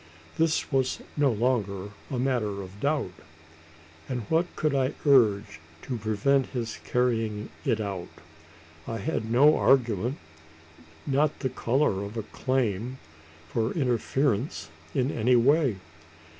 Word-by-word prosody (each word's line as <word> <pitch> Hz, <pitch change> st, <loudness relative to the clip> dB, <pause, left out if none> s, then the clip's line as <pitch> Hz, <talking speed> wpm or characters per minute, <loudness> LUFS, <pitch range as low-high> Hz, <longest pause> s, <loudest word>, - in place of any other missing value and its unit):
This 160 Hz, -1 st, +1 dB
was 130 Hz, -2 st, +1 dB
no 145 Hz, -3 st, +3 dB
longer 105 Hz, -4 st, -1 dB, 0.2 s
a 130 Hz, -, -3 dB
matter 115 Hz, -6 st, -1 dB
of 95 Hz, +2 st, -12 dB
doubt; 140 Hz, -7 st, 0 dB, 1.0 s
and 125 Hz, -2 st, -2 dB
what 165 Hz, +2 st, +2 dB
could 155 Hz, -2 st, 0 dB
I 135 Hz, +1 st, +1 dB
urge 110 Hz, -, +4 dB, 0.2 s
to 130 Hz, -, -3 dB
prevent 110 Hz, +6 st, +1 dB
his 115 Hz, -4 st, -4 dB
carrying 115 Hz, -4 st, 0 dB, 0.2 s
it 110 Hz, -, +1 dB
out? 100 Hz, -4 st, -4 dB, 0.8 s
I 115 Hz, -, -3 dB
had 115 Hz, -5 st, -2 dB
no 145 Hz, +6 st, +6 dB
argument 120 Hz, -1 st, +2 dB, 0.9 s
not 145 Hz, +2 st, +1 dB
the 130 Hz, -, 0 dB
colour 120 Hz, -5 st, +1 dB
of 100 Hz, +3 st, -7 dB
a 110 Hz, -, -2 dB
claim 125 Hz, -1 st, -1 dB, 0.5 s
for 110 Hz, +7 st, -1 dB
interference 125 Hz, -, 0 dB, 0.3 s
in 130 Hz, +2 st, +1 dB
any 120 Hz, +3 st, +3 dB
way! 135 Hz, 0 st, +4 dB
125 Hz, 125 wpm, -27 LUFS, 110-135 Hz, 1.0 s, no